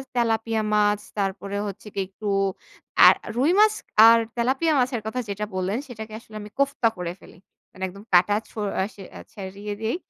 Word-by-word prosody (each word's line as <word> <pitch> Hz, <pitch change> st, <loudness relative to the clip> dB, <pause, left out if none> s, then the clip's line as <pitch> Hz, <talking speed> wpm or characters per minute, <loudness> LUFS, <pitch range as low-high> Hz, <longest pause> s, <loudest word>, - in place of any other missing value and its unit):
Tilapia 225 Hz, -1 st, +1 dB
মাছ 210 Hz, 0 st, +3 dB, 0.2 s
তারপরে 200 Hz, 0 st, -2 dB
হচ্ছে 200 Hz, +2 st, -8 dB
কি 200 Hz, -, -3 dB
একটু 205 Hz, +2 st, -8 dB, 0.8 s
আ -, -, +11 dB, 0.3 s
রুই 275 Hz, +7 st, +3 dB
মাছ 430 Hz, 0 st, +6 dB, 0.3 s
আর 230 Hz, 0 st, +7 dB, 0.2 s
তেলাপিয়া 265 Hz, +7 st, +1 dB
মাছের 250 Hz, -2 st, 0 dB
কথা 220 Hz, +3 st, -3 dB
যেটা 205 Hz, +1 st, -3 dB
বললেন 185 Hz, +4 st, -1 dB
সেটাকে 220 Hz, -3 st, -9 dB
আসলে 220 Hz, -2 st, -16 dB
আমি 210 Hz, -, -9 dB
কোফতা 280 Hz, -4 st, +2 dB
করে 175 Hz, -1 st, -3 dB
ফেলি। -, -, -16 dB, 0.3 s
মানে 190 Hz, -, -9 dB
একদম 200 Hz, +3 st, -11 dB
কাটা 185 Hz, +4 st, +5 dB
ছু -, -, -18 dB, 0.2 s
আ -, -, +2 dB
সে 195 Hz, -, -11 dB
আ -, -, -9 dB
ছাড়িয়ে 200 Hz, +1 st, -6 dB
দেই। 225 Hz, +8 st, -1 dB
215 Hz, 180 wpm, -24 LUFS, 200-235 Hz, 0.8 s, আ